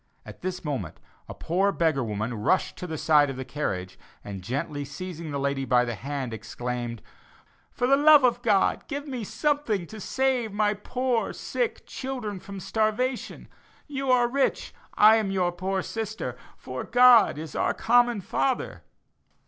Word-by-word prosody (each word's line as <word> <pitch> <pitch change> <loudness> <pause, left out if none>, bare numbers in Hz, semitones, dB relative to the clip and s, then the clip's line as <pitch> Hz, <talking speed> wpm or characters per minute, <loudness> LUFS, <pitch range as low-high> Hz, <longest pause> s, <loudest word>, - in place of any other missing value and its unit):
At - - -11
this 185 -2 -4
moment 125 - -4 0.3
a - - -7
poor 190 +4 +1
beggar 160 -8 +1
woman 110 +1 -3
rushed 115 - 0
to 180 - -6
the 160 -2 -4
side 150 -2 +4
of 135 - -4
the 130 - -5
carriage, 95 -12 -4 0.2
and 100 -2 -7
gently 140 +7 -3
seizing 165 +3 -7
the 140 -1 -3
lady 140 0 -1
by 125 -2 +3
the 120 - -3
hand, 130 +2 -4
exclaimed, 120 +1 -5 0.7
"For 245 - -1
the 270 +2 +5
love 295 -1 +7
of 245 -1 +3
God 210 -5 +2
give 285 0 -5
me 255 -4 -4
something 280 - -1
to 215 +6 -10
save 255 -2 0
my 205 0 +2
poor 245 +3 -1
sick 485 -3 -3
children 245 -7 -5
from 195 +1 -9
starvation. 225 +6 -1 0.4
You 275 -2 -4
are 245 -1 +4
rich; 270 +2 -1 0.2
I 215 +1 +7
am 215 -3 -1
your 185 -2 +1
poor 185 +2 -2
sister, 220 - -4 0.2
for 130 0 -6
God 245 -7 +6
is 155 0 -7
our - - 0
common 240 -2 +3
Father." 260 +7 -1
190 Hz, 165 wpm, -26 LUFS, -, 0.7 s, love